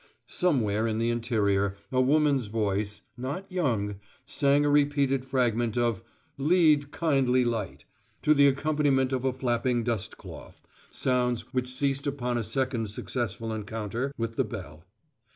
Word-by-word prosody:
Somewhere 115 - +1
in 110 -1 -1
the 115 +1 +1
interior 100 -4 0
a 130 0 +3
woman's 140 -2 +3
voice, 105 -1 -2
not 140 +10 -4
young, 110 - -1 0.3
sang 145 +1 +2
a - - +3
repeated 140 -2 +2
fragment 120 -3 0
of 120 -5 +1 0.4
"Lead, 150 -2 +4
Kindly 135 -6 +2
Light," 115 -4 -3 0.4
to 150 - +5
the 140 -1 +6
accompaniment 140 -2 +1
of 130 0 -1
a 130 - +2
flapping 120 -1 0
dust 115 -4 -3
cloth, - - -12 0.3
sounds 125 -2 0
which 125 0 -1
ceased 140 +1 0
upon 125 -4 -1
a - - -2
second 115 -1 -1
successful 115 +1 -3
encounter 110 +4 -3
with 115 0 -3
the - - +3
bell. 80 -7 -8
125 Hz, 140 wpm, -27 LUFS, 115-140 Hz, 0.4 s, the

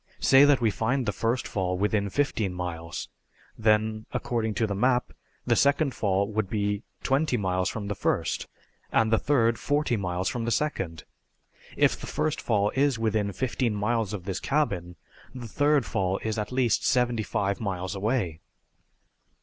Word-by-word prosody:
Say 135 +2 +6
that 145 -3 +4
we 115 -2 +3
find 125 +5 0
the 105 - +1
first 115 +3 -1
fall 90 -2 -1
within 100 +1 0
fifteen 110 -7 -1
miles. 85 -2 -5 0.5
Then, 110 0 +1
according 110 -3 -2
to 110 - +1
the 100 - -2
map, 125 +5 +1 0.3
the - - +3
second 140 0 +3
fall 100 -1 +1
would 110 -2 -2
be 105 -1 0
about 105 - -24
twenty 135 -1 +1
miles 95 -2 0
from 105 -2 -5
the 100 - -1
first, - - -1 0.4
and 110 0 +2
the 110 - +4
third 115 -5 +2
forty 145 -4 0
miles 90 -1 -2
from 120 -2 -2
the - - 0
second. 95 - -2 0.7
If - - +3
the - - -8
first 155 0 -1
fall 105 -3 +1
is 140 -2 +2
within 110 -2 0
fifteen 120 +1 -1
miles 110 0 0
of 105 -4 -5
this 95 -1 -3
cabin 90 - -1 0.4
the 120 -2 -6
third 145 +4 +2
fall 95 0 -1
is 110 -1 -2
at 105 - -4
least 125 -2 +1
seventy 120 -3 +2
five 100 -2 -1
miles 95 -3 -3
away." 100 -5 -1
110 Hz, 170 wpm, -27 LUFS, 100-125 Hz, 0.7 s, Say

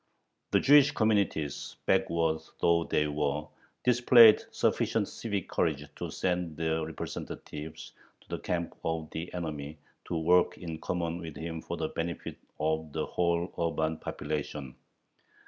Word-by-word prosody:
The - - +4
Jewish 145 0 +7
communities, 105 - 0
backward 80 -1 +2 0.2
though 85 -1 +3
they 75 - +1
were, 75 0 -1 0.4
displayed 120 -2 +7
sufficient - - +1
civic 100 -4 -3
courage 75 -4 0
to - - -4
send 90 -4 -1
their 80 0 0
representatives 80 0 -7 0.3
to - - -24
the - - -3
camp 85 -1 -2
of 80 -1 -2
the 85 +2 -5
enemy 75 -3 -5 0.3
to 85 - -2
work 90 +2 +3
in 80 -2 -6
common 85 0 -2
with 80 -3 -7
him 80 0 -5
for 85 - -5
the 80 - -2
benefit 85 0 -4 0.2
of 80 0 -1
the - - -1
whole 85 0 0
urban 80 -1 0
population. 75 -5 -4
80 Hz, 135 wpm, -30 LUFS, 80-90 Hz, 0.4 s, Jewish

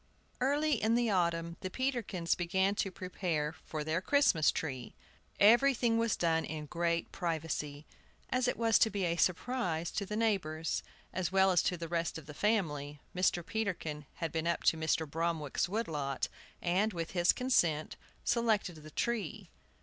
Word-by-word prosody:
EARLY 285 +1 +2
in 220 +2 +3
the 240 -2 +2
autumn 170 -2 0
the 185 - -3
Peterkins 235 -8 -1
began 190 +3 +1
to 200 - -1
prepare 175 -5 -2
for 155 -1 -3
their 160 +3 -1
Christmas 195 - +4
tree. 130 -6 -3 0.4
Everything 235 +1 +5
was 230 -1 +2
done 165 -1 +1
in 155 -1 -5
great 170 +1 -1
privacy, 155 -4 -3 0.5
as 255 0 +2
it - - 0
was 225 -1 +4
to 220 - +5
be 200 -3 -1
a 170 -1 +1
surprise 175 -2 0
to 205 - -2
the 210 +2 -4
neighbors, 165 -8 0 0.3
as 185 -2 -1
well 190 0 +5
as 175 -2 +4
to 180 - 0
the 165 0 -5
rest 170 0 -1
of 160 - -10
the 150 - -9
family. 150 -8 0 0.2
Mr. 180 -2 +1
Peterkin 170 -9 -3
had 165 -3 -3
been 165 0 -1
up 170 - 0
to - - +4
Mr. 160 0 0
Bromwick's 165 0 -1
wood 220 +3 -1
lot, 140 -3 -2 0.3
and, 195 +5 +2
with 165 -2 -4
his 175 -1 +4
consent, 170 - +1 0.3
selected 220 -7 +1
the 155 0 -11
tree. 210 0 -3
175 Hz, 165 wpm, -33 LUFS, 160-215 Hz, 0.5 s, Everything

